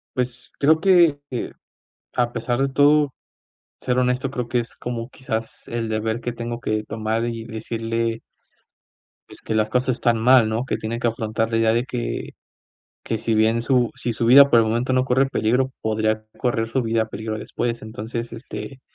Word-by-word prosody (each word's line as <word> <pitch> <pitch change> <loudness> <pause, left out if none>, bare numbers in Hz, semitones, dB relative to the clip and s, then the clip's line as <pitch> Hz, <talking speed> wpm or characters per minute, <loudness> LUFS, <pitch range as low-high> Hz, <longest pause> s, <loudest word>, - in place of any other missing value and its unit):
Pues 125 0 -3
creo 155 +3 +5
que 170 -5 +5
eh, 125 - -3 0.6
a 120 -1 +1
pesar 120 +1 -2
de 135 - +2
todo, 145 +1 +4 0.7
ser 125 0 0
honesto 125 +1 +1
creo 125 -3 -4
que 120 0 +1
es 120 - -8
como 120 0 -5
quizás 115 -4 -5
el 115 -1 -3
deber 110 +2 -1
que 120 - -2
tengo 120 0 -5
que 110 -2 -1
tomar, 110 +2 -2
y 115 -1 -4
decirle 115 0 -3 1.1
pues - - -12
que 110 - -3
las 110 0 +1
cosas 125 +2 +1
están 120 -2 +1
mal, 120 0 +5
¿no? 110 +3 -1
Que - - -1
tiene 115 +2 -4
que 120 - +1
afrontar 110 0 -2
la 115 - 0
idea 115 0 +3
de 120 +2 +1
que, 125 -2 -4 0.7
que 115 - -2
si 115 +1 0
bien 110 +2 +3
su 125 -1 +2
si 120 - -2
su 115 +1 -1
vida 140 +3 +8
por 120 - +6
el 110 - +2
momento 120 +4 0
no 130 0 +3
corre 130 +1 +3
peligro, 130 +1 +1
podría 110 0 0
correr 115 -2 0
su 130 +3 0
vida 115 -1 0
peligro 110 0 -4
después, 120 +1 -3
entonces, 115 +2 -5
este, 130 +3 -8
115 Hz, 185 wpm, -22 LUFS, 110-125 Hz, 1.1 s, vida